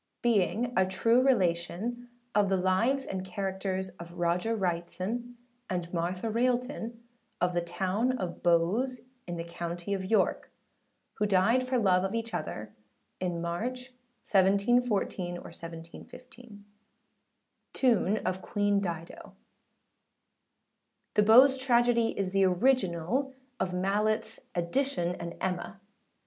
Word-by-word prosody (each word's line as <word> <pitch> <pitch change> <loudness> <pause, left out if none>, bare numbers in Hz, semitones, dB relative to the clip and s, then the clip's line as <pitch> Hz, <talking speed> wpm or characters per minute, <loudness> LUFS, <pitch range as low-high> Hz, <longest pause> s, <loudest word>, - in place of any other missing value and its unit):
Being 230 +1 +2
a 190 - +5
true 230 +6 +3
relation 225 +1 0 0.2
of 205 -1 +3
the 190 - +2
Lives 225 +9 +1
and 190 -1 -4
Characters 190 0 -3
of 170 0 -10
ROGER 175 +6 +1
WRIGHTSON 190 +6 -3 0.3
and 175 -1 -3
MARTHA 180 +5 -2
RAILTON, 240 0 -1 0.4
of 180 0 +1
the 175 - +1
Town 190 +8 0
of 180 -6 -5
Bowes, 195 +10 +2 0.3
in 175 -1 -4
the 165 - -3
County 170 +2 -5
of 190 -1 -2
York, 215 +4 +1 0.7
who 210 - +2
died 205 +7 +3
for 255 0 +1
love 190 -5 +3
of 195 +3 -2
each 230 -1 -3
other, 105 -8 -5 0.5
in 175 -2 -2
March, 250 +9 -4 0.3
1714/5 200 +1 -1 1.1
Tune 220 -5 +2
of 185 +1 -1
Queen 205 0 +1
Dido. 170 -3 -6 1.8
[The - - +4
Bowes 255 +6 +7
Tragedy 240 -3 +2
is 190 -2 -1
the 195 0 +3
original 225 - +1 0.2
of 190 - 0
Malletâs 205 +4 0 0.2
Edition 175 0 0
and 170 0 -6
Emma. 190 +2 -3
195 Hz, 115 wpm, -29 LUFS, 175-240 Hz, 1.8 s, Bowes